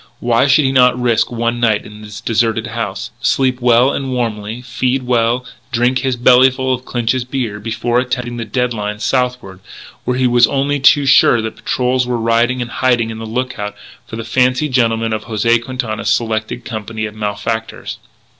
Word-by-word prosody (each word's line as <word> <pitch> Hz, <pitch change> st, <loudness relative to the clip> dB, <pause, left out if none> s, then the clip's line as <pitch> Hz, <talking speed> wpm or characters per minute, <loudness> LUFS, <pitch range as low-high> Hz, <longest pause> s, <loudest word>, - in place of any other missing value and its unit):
Why 120 Hz, +2 st, +2 dB
should 140 Hz, +1 st, +4 dB
he 130 Hz, -, +2 dB
not 125 Hz, -1 st, +4 dB
risk 120 Hz, -2 st, +1 dB
one 120 Hz, 0 st, -1 dB
night 110 Hz, -3 st, +1 dB
in 105 Hz, 0 st, -12 dB
this 105 Hz, 0 st, -9 dB
deserted 115 Hz, -1 st, 0 dB
house, 115 Hz, -4 st, -4 dB
sleep 130 Hz, 0 st, +1 dB
well 125 Hz, +2 st, +4 dB
and 135 Hz, -1 st, -3 dB
warmly, 115 Hz, -1 st, -3 dB
feed 130 Hz, +2 st, -1 dB
well, 120 Hz, 0 st, +1 dB, 0.3 s
drink 125 Hz, +2 st, +1 dB
his 130 Hz, 0 st, -1 dB
bellyfull 130 Hz, +1 st, +4 dB
of 130 Hz, 0 st, -5 dB
Clinch's 120 Hz, +1 st, -1 dB
beer, 120 Hz, -5 st, -4 dB
before 115 Hz, +2 st, -1 dB
attempting 125 Hz, -1 st, -3 dB
the 115 Hz, -, -3 dB
dead 125 Hz, +3 st, -1 dB
line 105 Hz, -1 st, -4 dB
southward, 125 Hz, -5 st, -2 dB, 0.4 s
where 125 Hz, 0 st, -1 dB
he 130 Hz, -, +1 dB
was 120 Hz, -2 st, +5 dB
only 140 Hz, +1 st, 0 dB
too 145 Hz, +1 st, +5 dB
sure 120 Hz, -3 st, +5 dB
that 110 Hz, -, -5 dB
patrols 125 Hz, 0 st, 0 dB
were 125 Hz, -1 st, -1 dB
riding 115 Hz, +2 st, +1 dB
and 120 Hz, -, -10 dB
hiding 120 Hz, -3 st, +1 dB
on 110 Hz, -, -7 dB
the 110 Hz, -, -6 dB
lookout 115 Hz, -3 st, -4 dB, 0.3 s
for -, -, -7 dB
the 115 Hz, -, -5 dB
fancy 125 Hz, +5 st, +1 dB
gentlemen 115 Hz, -3 st, +1 dB
of 110 Hz, 0 st, -4 dB
José 115 Hz, +1 st, +1 dB
Quintana's 120 Hz, -5 st, -3 dB
selected 110 Hz, +1 st, -1 dB
company 110 Hz, -1 st, -5 dB
of 105 Hz, -, -7 dB
malefactors? 110 Hz, +2 st, -4 dB
120 Hz, 180 wpm, -16 LUFS, 110-125 Hz, 0.4 s, was